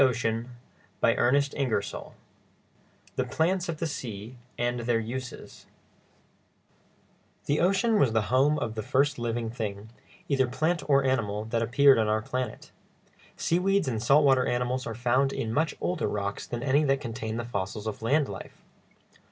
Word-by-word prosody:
[Illustration: 120 Hz, -2 st, +1 dB, 0.5 s
shipwreck] 140 Hz, +4 st, +4 dB
CHAPTER 135 Hz, -6 st, 0 dB
XII 100 Hz, -, -6 dB, 1.2 s
THE -, -, +2 dB
PLANTS 175 Hz, +2 st, 0 dB
OF 165 Hz, -, -2 dB
THE 165 Hz, -, -2 dB
SEA 115 Hz, -6 st, -6 dB, 0.2 s
AND 120 Hz, 0 st, -1 dB
THEIR 120 Hz, 0 st, +1 dB
USES 125 Hz, +3 st, -7 dB, 1.8 s
The 145 Hz, -, +1 dB
ocean 200 Hz, +5 st, +3 dB
was 130 Hz, -, +4 dB
the 110 Hz, -1 st, +2 dB
home 145 Hz, +4 st, +4 dB
of 110 Hz, -6 st, -3 dB
the 110 Hz, -, -3 dB
first 140 Hz, +5 st, +1 dB
living 115 Hz, -1 st, -2 dB
thing, 110 Hz, -3 st, -5 dB, 0.4 s
either 135 Hz, -2 st, +2 dB
plant 160 Hz, +7 st, 0 dB
or 140 Hz, -1 st, +5 dB
animal, 110 Hz, -5 st, 0 dB
that 115 Hz, +1 st, -1 dB
appeared 130 Hz, +2 st, +5 dB
on 110 Hz, -, +2 dB
our 110 Hz, 0 st, +1 dB
planet; 130 Hz, +2 st, -4 dB, 0.7 s
seaweeds 190 Hz, 0 st, +1 dB
and 115 Hz, -4 st, -1 dB
salt 140 Hz, +5 st, +5 dB
water 130 Hz, -2 st, +4 dB
animals 125 Hz, +1 st, -1 dB
are 115 Hz, -, -4 dB
found 125 Hz, +4 st, +2 dB
in 110 Hz, -4 st, -3 dB
much 155 Hz, +4 st, +1 dB
older 180 Hz, -3 st, -1 dB
rocks 100 Hz, -1 st, -3 dB
than 120 Hz, 0 st, -4 dB
any 140 Hz, +2 st, +3 dB
that 135 Hz, -1 st, +2 dB
contain 115 Hz, -2 st, -4 dB
the 120 Hz, -, -3 dB
fossils 100 Hz, -1 st, -4 dB
of 110 Hz, -1 st, -4 dB
land 140 Hz, +6 st, +2 dB
life. -, -, -9 dB
125 Hz, 160 wpm, -27 LUFS, 115-140 Hz, 1.8 s, or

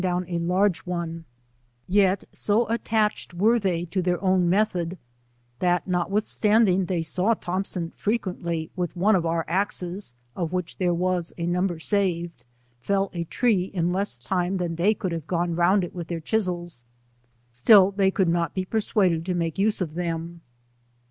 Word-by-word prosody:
down 180 Hz, 0 st, 0 dB
a 170 Hz, -1 st, -2 dB
large 180 Hz, +1 st, +2 dB
one; 170 Hz, -2 st, -5 dB, 0.6 s
yet 195 Hz, 0 st, +3 dB, 0.2 s
go 215 Hz, +3 st, +3 dB
attached 220 Hz, -5 st, 0 dB
were 220 Hz, +6 st, +3 dB
they 175 Hz, -4 st, -1 dB
to 185 Hz, +2 st, -2 dB
their 180 Hz, -1 st, 0 dB
own 185 Hz, -2 st, +3 dB
method, 185 Hz, -3 st, 0 dB, 0.6 s
that 175 Hz, -1 st, +1 dB
notwithalanding 195 Hz, +1 st, +2 dB
they 170 Hz, -2 st, -1 dB
saw 185 Hz, +8 st, +1 dB
Thompson 180 Hz, -2 st, -3 dB
frequently 180 Hz, -7 st, -3 dB
with 180 Hz, -2 st, -3 dB
one 205 Hz, +4 st, +4 dB
of 185 Hz, -, +2 dB
cur 165 Hz, 0 st, -1 dB
a>;e8, 180 Hz, -3 st, -1 dB, 0.2 s
of 170 Hz, -2 st, -3 dB
which 180 Hz, -2 st, -3 dB
there 180 Hz, -2 st, +2 dB
was 175 Hz, 0 st, -1 dB
a 170 Hz, -, -2 dB
number 175 Hz, 0 st, 0 dB
saved, 170 Hz, -, -1 dB, 0.4 s
fell 195 Hz, +7 st, 0 dB
a 170 Hz, -1 st, -3 dB
tree 210 Hz, -1 st, +1 dB
in 180 Hz, -2 st, -1 dB
less 195 Hz, -8 st, 0 dB
time 180 Hz, +8 st, -1 dB
tiiaa 175 Hz, -2 st, -2 dB
Ihey 200 Hz, +6 st, +2 dB
could 185 Hz, -4 st, -3 dB
have 165 Hz, -2 st, -5 dB
g;one 175 Hz, -1 st, -1 dB
round 180 Hz, +3 st, +3 dB
it 175 Hz, -, -6 dB
with 175 Hz, -3 st, -6 dB
their 170 Hz, -1 st, -3 dB
chisels, 175 Hz, -, -2 dB, 0.7 s
siill 190 Hz, -, +6 dB
they 195 Hz, -1 st, +3 dB
cotiid 190 Hz, -2 st, +1 dB
aot 170 Hz, -1 st, 0 dB
be 185 Hz, -1 st, -1 dB
persuaded 190 Hz, -5 st, +1 dB
to 180 Hz, -, 0 dB
ttsalie 165 Hz, -2 st, -1 dB
Use 210 Hz, 0 st, +1 dB
of 160 Hz, -4 st, -2 dB
them. 170 Hz, 0 st, -4 dB
180 Hz, 165 wpm, -25 LUFS, 170-195 Hz, 0.7 s, siill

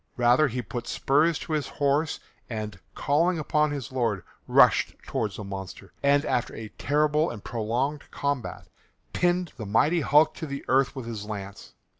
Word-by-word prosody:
Rather 125 Hz, +5 st, +5 dB
he 125 Hz, -1 st, -3 dB
put 120 Hz, 0 st, -6 dB
spurs 150 Hz, +4 st, +2 dB
to 160 Hz, -, -5 dB
his 150 Hz, -2 st, 0 dB
horse 145 Hz, +2 st, 0 dB, 0.3 s
and, 105 Hz, -4 st, -5 dB, 0.2 s
calling 165 Hz, +5 st, +2 dB
upon 150 Hz, 0 st, +1 dB
his 140 Hz, -5 st, -5 dB
Lord, 115 Hz, -7 st, 0 dB, 0.2 s
rushed -, -, +5 dB
towards 105 Hz, -4 st, -2 dB
the 105 Hz, -, -6 dB
monster, 95 Hz, -1 st, -8 dB
and, 140 Hz, 0 st, +3 dB
after 120 Hz, -, -1 dB
a 110 Hz, -1 st, -7 dB
terrible 150 Hz, +5 st, +1 dB
and 110 Hz, -4 st, -8 dB
prolonged 120 Hz, +6 st, -2 dB
combat, 140 Hz, -3 st, -3 dB, 0.5 s
pinned 175 Hz, -1 st, +1 dB
the 110 Hz, -, -5 dB
mighty 150 Hz, -, +3 dB
hulk 150 Hz, +2 st, +4 dB
to 160 Hz, -, -5 dB
the 140 Hz, 0 st, -6 dB
earth 135 Hz, +1 st, +2 dB
with 130 Hz, -3 st, -6 dB
his 110 Hz, -3 st, -5 dB
lance. 100 Hz, -2 st, -7 dB
135 Hz, 165 wpm, -26 LUFS, 115-150 Hz, 0.5 s, Rather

